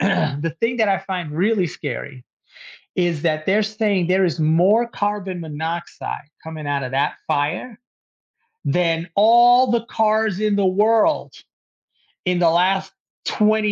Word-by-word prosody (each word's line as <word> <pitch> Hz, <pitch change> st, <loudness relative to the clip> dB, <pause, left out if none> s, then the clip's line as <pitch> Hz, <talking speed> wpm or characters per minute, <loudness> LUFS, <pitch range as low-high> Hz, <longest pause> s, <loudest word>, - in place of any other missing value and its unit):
the 160 Hz, -5 st, 0 dB
thing 235 Hz, +2 st, 0 dB
that 220 Hz, -3 st, +2 dB
I 195 Hz, -1 st, +2 dB
find 185 Hz, -4 st, -5 dB
really 190 Hz, +4 st, +1 dB
scary 135 Hz, -4 st, -7 dB, 0.7 s
is 175 Hz, -4 st, 0 dB
that 155 Hz, -2 st, -1 dB
they're 205 Hz, +3 st, +3 dB
saying 210 Hz, -4 st, 0 dB
there 190 Hz, +2 st, +2 dB
is 170 Hz, -1 st, -2 dB
more 175 Hz, +9 st, +3 dB
carbon 205 Hz, -5 st, -3 dB
monoxide 160 Hz, 0 st, -5 dB, 0.2 s
coming 160 Hz, -2 st, -7 dB
out 140 Hz, -1 st, -1 dB
of 130 Hz, -, -5 dB
that 135 Hz, +2 st, 0 dB
fire, 155 Hz, -, -2 dB, 0.9 s
than 170 Hz, -1 st, 0 dB
all 240 Hz, +4 st, +5 dB
the 235 Hz, -1 st, 0 dB
cars 215 Hz, -3 st, +1 dB
in 210 Hz, -1 st, +1 dB
the 200 Hz, -1 st, +1 dB
world 220 Hz, +10 st, +2 dB, 0.9 s
in 180 Hz, -1 st, +1 dB
the 170 Hz, -2 st, +4 dB
last 185 Hz, +3 st, +1 dB, 0.3 s
20 215 Hz, 0 st, +2 dB
185 Hz, 140 wpm, -20 LUFS, 160-215 Hz, 0.9 s, all